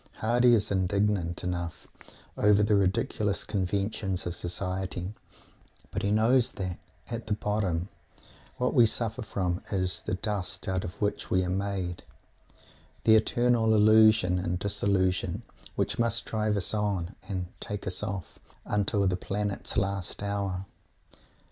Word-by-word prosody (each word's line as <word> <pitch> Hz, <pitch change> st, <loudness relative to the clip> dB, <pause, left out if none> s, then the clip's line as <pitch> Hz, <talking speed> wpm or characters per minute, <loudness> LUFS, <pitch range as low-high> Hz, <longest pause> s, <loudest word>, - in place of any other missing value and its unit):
Mr. -, -, -20 dB
Hardy 120 Hz, +2 st, +4 dB
is 105 Hz, -2 st, 0 dB
indignant 95 Hz, -2 st, 0 dB
enough 90 Hz, -1 st, -4 dB, 0.5 s
over 105 Hz, 0 st, +4 dB
the 105 Hz, 0 st, +3 dB
ridiculous 100 Hz, +1 st, +1 dB
conventions 100 Hz, -1 st, -1 dB
of 85 Hz, 0 st, -2 dB
Society, 90 Hz, +1 st, -3 dB, 0.8 s
but -, -, -2 dB
he 100 Hz, -, 0 dB
knows 115 Hz, +4 st, +3 dB
that, 90 Hz, -2 st, -4 dB, 0.3 s
at 115 Hz, -1 st, -4 dB
the 105 Hz, -, +1 dB
bottom, 100 Hz, -5 st, -1 dB, 0.7 s
what 125 Hz, 0 st, 0 dB
we 120 Hz, -5 st, +6 dB
suffer 115 Hz, +2 st, -2 dB
from 95 Hz, -4 st, -2 dB
is 95 Hz, -3 st, 0 dB
"the -, -, -2 dB
dust 95 Hz, -2 st, -2 dB
out 95 Hz, -1 st, 0 dB
of 85 Hz, -, -7 dB
which 105 Hz, -, -1 dB
we 95 Hz, 0 st, +2 dB
are 90 Hz, -, -2 dB
made;" 95 Hz, -2 st, -2 dB, 1.0 s
the 110 Hz, -, +6 dB
eternal 115 Hz, 0 st, +3 dB
illusion 110 Hz, -3 st, +5 dB
and 90 Hz, 0 st, -1 dB
disillusion 95 Hz, 0 st, 0 dB, 0.3 s
which -, -, -1 dB
must 115 Hz, 0 st, +1 dB
drive 110 Hz, -1 st, 0 dB
us 100 Hz, -, -2 dB
on 100 Hz, -4 st, -1 dB, 0.2 s
and 90 Hz, -2 st, -2 dB
"take 105 Hz, -1 st, -5 dB
us 95 Hz, -, -3 dB
off" 100 Hz, -4 st, -5 dB, 0.3 s
until 100 Hz, -1 st, +1 dB
the 90 Hz, -1 st, +2 dB
planet's 100 Hz, +2 st, -2 dB
last 100 Hz, -1 st, -1 dB
hour. 100 Hz, -2 st, -2 dB, 0.5 s
Mr. -, -, -27 dB
100 Hz, 140 wpm, -28 LUFS, 90-105 Hz, 1.0 s, we